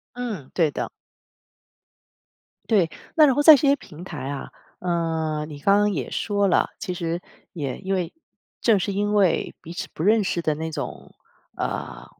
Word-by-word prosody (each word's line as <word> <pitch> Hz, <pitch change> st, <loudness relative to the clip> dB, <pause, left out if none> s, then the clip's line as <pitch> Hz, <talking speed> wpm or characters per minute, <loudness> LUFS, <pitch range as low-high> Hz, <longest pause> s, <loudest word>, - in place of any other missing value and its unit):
嗯， 220 Hz, -, -5 dB
对 165 Hz, -4 st, +3 dB
的。 -, -, -4 dB, 1.8 s
对， 190 Hz, -7 st, +4 dB, 0.3 s
那 310 Hz, -, +8 dB
然 270 Hz, -, +5 dB
后 290 Hz, -, +1 dB
在 305 Hz, 0 st, +10 dB
这 280 Hz, -, 0 dB
些 280 Hz, -, +6 dB
平 165 Hz, -, -11 dB
台 150 Hz, -8 st, -6 dB
啊， 140 Hz, -1 st, -5 dB, 0.3 s
呃 160 Hz, -3 st, -1 dB
你 150 Hz, -2 st, -8 dB
刚 195 Hz, +7 st, +4 dB
刚 205 Hz, 0 st, +3 dB
也 -, -, -3 dB
说 205 Hz, -1 st, 0 dB
了， -, -, +3 dB
其 190 Hz, -, -4 dB
实 170 Hz, 0 st, -3 dB, 0.3 s
也 140 Hz, -6 st, -3 dB
因 195 Hz, 0 st, -2 dB
为 180 Hz, -3 st, -2 dB, 0.5 s
正 225 Hz, -4 st, +4 dB
是 190 Hz, +2 st, -1 dB
因 205 Hz, +1 st, 0 dB
为 195 Hz, -4 st, +2 dB
彼 165 Hz, -, -8 dB
此 185 Hz, +2 st, -5 dB
不 -, -, -4 dB
认 215 Hz, +4 st, +4 dB
识 180 Hz, -3 st, -1 dB
的 155 Hz, -2 st, +1 dB
那 160 Hz, +2 st, -4 dB
种， 150 Hz, -3 st, -6 dB, 0.4 s
呃 -, -, -4 dB
180 Hz, 185 characters per minute, -24 LUFS, 160-205 Hz, 1.8 s, 在